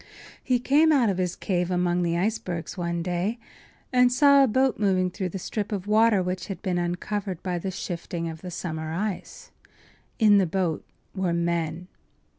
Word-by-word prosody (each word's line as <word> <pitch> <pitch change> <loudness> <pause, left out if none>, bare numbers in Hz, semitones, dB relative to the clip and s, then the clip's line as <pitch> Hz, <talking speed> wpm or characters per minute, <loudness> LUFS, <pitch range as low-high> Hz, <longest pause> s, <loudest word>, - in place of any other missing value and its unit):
He 255 -2 +2
came 290 +6 +4
out 260 -7 +4
of 185 - -3
his 180 -1 -1
cave 180 -2 -1
among 180 -1 +1
the 170 -1 0
icebergs 180 -3 -2
one 170 -2 -2
day 180 +6 -1 0.6
and 250 0 +5
saw 280 +2 +6
a - - +4
boat 260 +2 +1
moving 185 -3 +2
through 185 0 -3
the 195 - -5
strip 205 +3 -4
of 200 -3 -3
water 215 -2 +4
which 185 0 -3
had 195 - -5
been 180 -3 0
uncovered 180 +2 -3
by 180 -2 -2
the 190 - -3
shifting 170 -2 -4
of 160 -1 -7
the 180 - -7
summer 160 -3 -4
ice. 195 +2 -5 0.7
In 210 -3 +6
the 190 - +2
boat 175 -2 -1 0.3
were 190 -3 -1
men. 170 0 -1
185 Hz, 180 wpm, -25 LUFS, 175-210 Hz, 0.7 s, saw